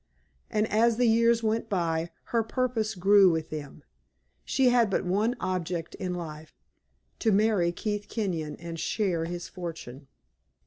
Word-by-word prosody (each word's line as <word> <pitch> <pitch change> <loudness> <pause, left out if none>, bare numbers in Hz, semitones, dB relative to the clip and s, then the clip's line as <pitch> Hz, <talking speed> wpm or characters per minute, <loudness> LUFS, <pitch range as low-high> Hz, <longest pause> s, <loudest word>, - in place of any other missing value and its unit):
And 215 -1 +1
as 225 +1 +3
the 245 - +3
years 230 0 +4
went 225 +1 0
by, 170 -4 0 0.2
her 230 - +4
purpose 225 -2 -1
grew 195 +1 +6
with 160 -2 -2
them; 150 -3 -7 0.6
she 265 -2 +3
had 240 -3 +4
but 195 - 0
one 210 +7 +1
object 180 -2 -3
in 180 -2 -4
life 155 -2 -8 0.6
to 225 - +2
marry 200 -4 +3
Keith 205 +3 -3
Kenyon 170 -9 -2
and 165 -1 -7
share 180 -6 0
his 175 +1 -5
fortune. 160 -7 -8
190 Hz, 145 wpm, -28 LUFS, 170-225 Hz, 0.6 s, grew